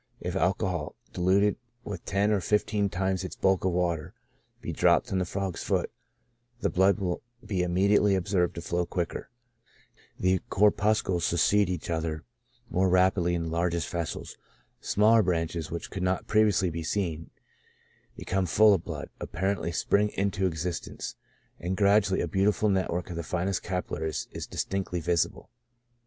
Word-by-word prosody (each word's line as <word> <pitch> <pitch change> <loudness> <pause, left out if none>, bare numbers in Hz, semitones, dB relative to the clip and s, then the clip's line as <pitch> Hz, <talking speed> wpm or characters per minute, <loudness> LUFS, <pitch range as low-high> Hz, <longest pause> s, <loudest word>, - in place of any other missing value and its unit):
If - - -4
alcohol^ - - -1 0.2
diluted 95 +3 +2 0.3
with 100 -5 -6
ten 100 +2 +1
or 100 -2 +2
fifteen 105 0 +1
times 95 0 -1
its - - -6
bulk 95 -1 +2
of 95 - +2
water, 85 -3 -1 0.4
be - - -5
dropped - - +3
on 95 - +1
the 90 - 0
frog's 95 -1 -3
foot, - - 0 0.7
the - - 0
blood 95 +3 +4
will 90 -4 -2 0.2
be 100 -4 -1
immediately 100 +3 +3
observed 95 -1 0
to 85 - -5
flow 85 +1 -1
quicker; 85 0 -3 0.9
the 95 0 +2
corpuscles 100 -3 +2
succeed 100 +3 +3
each 85 -1 -3
other 80 -1 -2 0.5
more 95 +1 +2
rapidlv 90 -1 +3
in 85 -1 -1
the 80 - -4
largest 85 0 0
vessels; 85 -2 -4 0.4
smajler 110 +2 +4
branches, 85 -3 -1
which 85 - -6
could 95 - -4
not 90 0 0
previously 105 -4 +3
be 85 +1 -4
seen, 80 -2 -2 0.9
becoming 95 -1 -1
full 105 +5 +6
of 90 -4 0
blood, 80 -6 -6
apparently 95 -1 -2
spring 100 +5 +2
into 100 -1 0
exist 85 -1 -3
ence, - - -7 0.4
and 90 +3 -3
gradually 100 -1 +3
a - - -1
beautiful 105 +2 +2
network 90 -2 -1
of - - -5
the 85 - -2
finest 90 +3 -1
capil 90 0 -3
laries 80 0 -3
is - - -6
distinctly 95 -2 -2
visible. 85 0 -1
95 Hz, 155 wpm, -28 LUFS, 85-100 Hz, 0.9 s, full